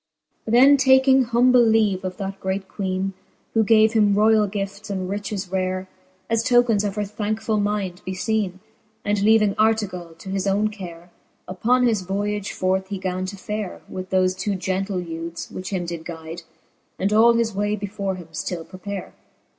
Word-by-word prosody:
XVII. 220 - -4
Then 270 +4 +7
taking 265 0 +5
humble 245 +1 +4
leave 220 -4 +2
of 185 -1 -4
that 195 0 -5
great 190 0 -3
Queene, 190 -1 -2 0.4
Who 225 - +3
gave 220 +1 +5
him 210 -3 +4
roiall 215 0 +4
gifts 200 +1 -5
and 190 -2 -3
riches 200 -1 -4
rare. 185 0 -1 0.4
As 225 -1 +1
tokens 240 -3 +3
of 205 -1 -2
her 210 - -1
thankefull 215 +1 -2
mind 205 -3 -2
befeene, 190 +1 -1 0.5
And 205 -1 +1
leaving 215 -1 +4
Artegall 195 -6 0
to 190 - -10
his 195 0 -1
owne 205 +2 +2
care; 175 -4 -10 0.4
Uppon 240 +8 +2
his 220 -5 +2
voyage 205 +2 -2
forth 190 +1 0
he 200 0 -4
gan 185 0 -3
to 200 +1 -7
fare, 210 0 -5
With 185 0 -7
thofe 185 -1 +2
two 205 0 -1
gentle 190 +1 -2
youthes, 165 -1 -6
which 185 - -6
him 185 -3 -2
did 170 -1 -5
guide, 165 0 -7 0.6
And 200 +2 0
all 230 +2 +6
his 230 -2 0
way 205 +1 0
before 200 -1 -3
him 175 -3 -11
ftill 165 +1 -4
prepare. 190 +1 -7
200 Hz, 170 wpm, -23 LUFS, 185-215 Hz, 0.6 s, Then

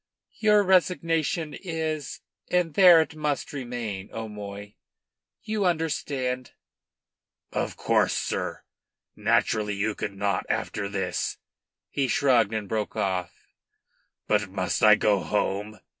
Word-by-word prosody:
"Your 210 -1 +5
resignation 165 -3 +1
is, 160 -5 -4 0.3
and 180 -3 +1
there 180 -3 +8
it 160 - -4
must 150 -2 -2
remain, 120 -7 -5
O'Moy. 105 -2 -7 0.7
You 215 -1 -1
understand?" 140 -7 -1 1.0
"Of - - -2
course, - - +2
sir. - - -3 0.5
Naturally 105 -2 +1
you 105 +2 0
could 100 - -4
not 100 -1 -1
after 100 - -2
this 100 -1 -2 0.2
" - - -66
He 135 -2 0
shrugged 120 -4 +3
and 110 -2 -3
broke 110 0 -2
off. 90 -2 -1 0.9
"But 105 -2 +1
must 95 -1 -1
I 105 0 +8
go 105 -1 +2
home?" 105 +1 -2
120 Hz, 115 wpm, -26 LUFS, 105-160 Hz, 1.0 s, there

